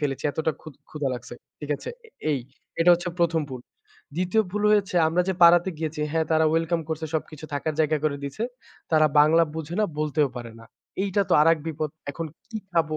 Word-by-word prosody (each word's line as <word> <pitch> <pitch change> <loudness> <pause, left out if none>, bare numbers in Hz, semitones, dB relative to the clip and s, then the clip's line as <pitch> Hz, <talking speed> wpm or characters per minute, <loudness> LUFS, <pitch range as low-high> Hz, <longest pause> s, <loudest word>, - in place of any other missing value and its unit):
ফেলেছি। 140 -3 -2
এতটা 160 +2 -1
ক্ষু - - -10 0.2
ক্ষুধা 150 -3 -2
লাগছে। 120 0 -8 0.3
ঠিক 150 -1 -6
আছে? - - -7 0.4
এই 145 - +1 0.4
এটা 170 +2 +6
হচ্ছে 175 +1 -4
১ম 165 -1 +2
ভুল। 130 -2 -7 0.6
২য় 185 +5 +2
ভুল 205 +2 -2
হয়েছে 205 -2 +2
আমরা 175 +3 +2
যে - - +2
পাড়াতে 175 +2 +7
গিয়েছি, 160 -1 -3
হ্যা 160 - +1
তারা 160 0 +4
ওয়েলকাম 165 +1 +1
করছে 160 0 -3
সবকিছু 155 -1 -4
থাকার 150 +2 -2
জায়গা 155 0 +2
করে 150 -2 +1
দিয়েছে। 140 +10 -5 0.5
তারা 155 -1 +6
বাংলা 155 +3 +6
বুঝে 160 +1 -5
না, 215 - +4
বলতেও 150 -1 +1
পারে 120 -2 -7
না। 115 - -13 0.4
এইটা 200 0 +1
তো - - +1
আরেক 165 +1 +4
বিপদ। 155 -1 -2 0.2
এখন 165 +3 -5 0.2
কি 225 - -4 0.2
খাবো? 160 -2 +1
160 Hz, 195 wpm, -25 LUFS, 150-170 Hz, 0.6 s, পাড়াতে